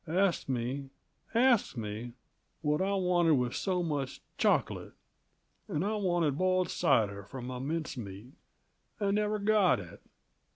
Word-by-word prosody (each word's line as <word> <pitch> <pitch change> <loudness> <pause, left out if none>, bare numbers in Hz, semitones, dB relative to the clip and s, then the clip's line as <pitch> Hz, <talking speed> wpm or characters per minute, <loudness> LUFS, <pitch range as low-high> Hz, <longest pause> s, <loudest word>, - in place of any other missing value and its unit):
Asked 180 -1 +1
me 130 +2 -2 0.5
asked 240 - +4
me, 110 +2 -5 0.5
what 150 +2 +1
I 195 +1 +1
wanted 180 -3 +3
with 125 -2 0
so 185 -2 0
much 145 -5 -2 0.2
choc'late. - - +1 0.7
And 155 +6 -1
I 215 +1 0
wanted 175 -7 +1
boiled 185 0 +2
cider 100 -2 +2
for 100 +7 -10
m' 125 +1 -5
mince 160 -2 -2
meat, 105 +3 -8 0.7
and 200 -1 +1
never 210 +1 +1
got 205 - +3
it. 85 -4 -10
155 Hz, 135 wpm, -31 LUFS, 125-190 Hz, 0.7 s, asked